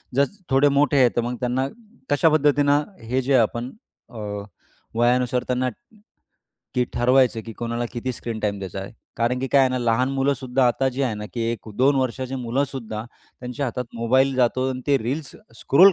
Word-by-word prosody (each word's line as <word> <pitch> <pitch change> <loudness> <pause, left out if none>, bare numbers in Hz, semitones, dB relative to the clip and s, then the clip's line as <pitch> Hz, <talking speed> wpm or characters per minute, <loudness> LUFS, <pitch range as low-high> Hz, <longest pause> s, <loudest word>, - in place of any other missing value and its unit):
जर 140 +1 +5 0.2
थोडे 135 +2 +4
मोठे 145 -1 +3
आहेत, 125 -2 +5
तर 120 - +2
मग 120 +1 -3
त्यांना 130 +2 0 0.4
कशा 150 +3 +4
पद्धतीनं 145 -1 +3 0.2
हे 125 +4 -1
जे 135 +2 0
आपण 120 +2 0 0.4
अ, 115 - -12 0.8
वयानुसार 125 +1 +2
त्यांना, 125 0 0 1.1
की 125 -1 +2
ठरवायचं 125 -1 +3
की 115 - -6
कोणाला 120 +2 -3
किती 125 +1 -3
स्क्रीन 115 -1 -5
टाईम 100 -1 -1
द्यायचा 95 0 -5
आहे. 95 - -8 0.2
कारण 120 +2 +1
की 135 - -2
काय 140 - +5
आहे 130 - +5
ना 130 - -1
लहान 120 +2 +2
मुलंसुद्धा 135 -2 +1
आता 130 +2 +2
जी 130 +2 -2
आहे 120 -5 0
ना, 105 0 -6
की 120 - -3
1-2 125 +5 +1
वर्षाची 130 0 -1
मुलंसुद्धा 125 -3 -3 0.4
त्यांच्या 125 +3 -3
हातात 125 +1 -3
मोबाईल 130 +4 +2
जातो 130 +1 +2
आणि 130 0 -4
ते 140 -1 +4
रील्स 135 +6 -4 0.3
स्क्रोल 185 +8 +7
125 Hz, 175 wpm, -23 LUFS, 120-135 Hz, 1.1 s, स्क्रोल